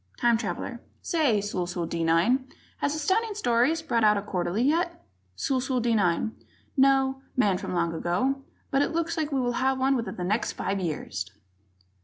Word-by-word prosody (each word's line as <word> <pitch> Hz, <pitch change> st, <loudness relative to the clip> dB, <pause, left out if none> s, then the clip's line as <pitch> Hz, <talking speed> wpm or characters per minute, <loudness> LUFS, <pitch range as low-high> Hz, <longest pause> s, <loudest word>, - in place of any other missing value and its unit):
Time 235 Hz, -1 st, +4 dB
Traveler: 225 Hz, -, -4 dB, 0.2 s
"Say, 285 Hz, -, +2 dB
Sulsu 180 Hz, -3 st, -2 dB
D 165 Hz, 0 st, -2 dB
9, 215 Hz, +12 st, +3 dB, 0.3 s
has 285 Hz, +1 st, 0 dB
Astounding 405 Hz, +8 st, 0 dB
Stories 315 Hz, -, +2 dB
brought 235 Hz, -8 st, +1 dB
out 210 Hz, -1 st, +5 dB
a 200 Hz, -, -2 dB
Quarterly 185 Hz, +2 st, -1 dB
yet?" 340 Hz, +4 st, 0 dB, 0.3 s
Sulsu 260 Hz, -2 st, 0 dB
D 235 Hz, 0 st, +1 dB
9: 200 Hz, +1 st, +1 dB, 0.4 s
"No, 270 Hz, -1 st, +3 dB, 0.2 s
Man 200 Hz, -7 st, +3 dB
from -, -, -6 dB
the -, -, -2 dB
Long 170 Hz, -1 st, +1 dB
Ago, 220 Hz, +12 st, 0 dB, 0.3 s
but 275 Hz, -, +3 dB
it 285 Hz, -, 0 dB
looks 335 Hz, 0 st, -1 dB
like 310 Hz, -3 st, -2 dB
we'll 255 Hz, -3 st, +1 dB
have 265 Hz, 0 st, +2 dB
one 265 Hz, +1 st, +2 dB
within 235 Hz, -3 st, -3 dB
the 180 Hz, -, -4 dB
next 210 Hz, +6 st, 0 dB
five 195 Hz, +1 st, -2 dB
years!" 145 Hz, -, -3 dB
245 Hz, 175 wpm, -27 LUFS, 190-275 Hz, 0.4 s, out